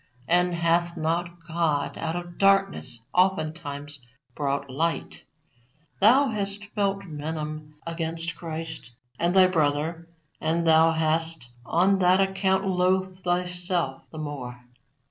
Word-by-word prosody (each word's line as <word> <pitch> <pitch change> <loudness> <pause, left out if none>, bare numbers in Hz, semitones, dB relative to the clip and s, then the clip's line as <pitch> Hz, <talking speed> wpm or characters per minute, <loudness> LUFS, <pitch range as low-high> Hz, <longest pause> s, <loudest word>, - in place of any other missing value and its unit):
And 180 +1 +3
hath 170 +1 +1
not 170 +1 -2
God 160 -4 0
out 160 0 -3
of 175 0 -7
darkness 195 -11 +2
oftentimes 155 -6 0 0.3
brought 140 0 -2
light? 155 +4 -2 0.7
Thou 255 +7 +6
hast 205 -1 -3
felt 200 -1 0
venom 155 -1 -5
against 165 0 -3
Christ 160 -5 -6 0.3
and 175 +2 +1
thy 190 -1 +8
brother, 160 -1 0 0.3
and 165 +2 0
thou 160 0 +5
hast 160 -3 0 0.2
on 190 +3 +3
that 185 +1 +4
account 190 0 +1
loathed 185 0 +1
thyself 175 -4 -1
the 155 - -9
more. 130 -5 -6
170 Hz, 115 wpm, -26 LUFS, 155-185 Hz, 0.7 s, thy